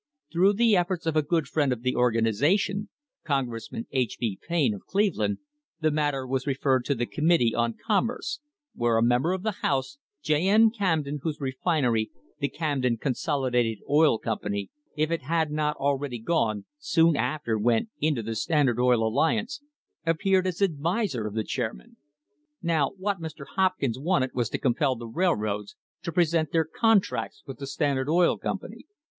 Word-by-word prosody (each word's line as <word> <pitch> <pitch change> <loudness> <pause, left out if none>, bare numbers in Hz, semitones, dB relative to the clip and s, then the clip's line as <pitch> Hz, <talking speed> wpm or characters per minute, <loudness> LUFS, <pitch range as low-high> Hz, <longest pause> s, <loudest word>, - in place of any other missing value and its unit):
Through 190 +4 +4
the 225 0 +4
efforts 175 -1 0
of 160 -1 0
a 155 - +4
good 155 0 0
friend 140 -1 +1
of 120 -1 -3
the 125 - 0
organisation 125 - +1 0.2
— - - -65
Congressman 120 -5 -3
H. 130 -1 -1
B. 110 -5 -2
Payne, 155 -9 +2
of 100 - -10
Cleveland 205 0 +1 0.2
— 295 - -61
the 155 0 +2
matter 145 -3 0
was 130 +1 -2
referred 135 -2 +1
to 140 - +1
the 120 0 -1
Committee 150 -5 +2
on 115 -1 0
Commerce, 230 - 0 0.3
where 120 -1 +1
a 115 - +3
member 125 +8 +2
of 185 0 -2
the 215 -3 -2
house, 135 0 -1 0.2
J. 155 +4 +2
N. 220 +2 +6
Camden, 160 -9 -1
whose 155 -1 -3
refinery, 130 -4 0 0.3
the 140 - 0
Camden 135 -7 -1
Consolidated 125 -3 0
Oil 150 -4 +4
Company, 100 -3 -3 0.3
if 155 +2 +1
it 165 - 0
had 160 +2 0
not 150 0 0
already 140 -2 -1
gone, 110 -6 0
soon 165 +2 +3
after 140 -8 -1
went 115 - +1
into 150 -6 0
the 115 +1 -3
Standard 125 +1 +1
Oil 125 -3 +3
Alliance, 220 - 0 0.4
appeared 185 +3 +2
as 185 +2 -1
adviser 165 - 0
of 105 - -7
the 110 - 0
chairman! 135 - -5 0.7
Now 160 -5 +2
what 195 -1 -2
Mr. 155 -3 -7
Hopkins 185 -11 +1
wanted 145 -4 +1
was 120 -3 -1
to - - -2
compel 130 +1 +1
the 120 0 -8
railroads 110 - -1 0.3
to 170 - -4
present 165 -2 +1
their 165 -2 +2
contracts 220 +5 +1
with 135 -2 -9
the 140 - -5
Standard 140 -1 0
Oil 175 +2 +3
Company. - - -5
145 Hz, 170 wpm, -26 LUFS, 120-170 Hz, 0.7 s, N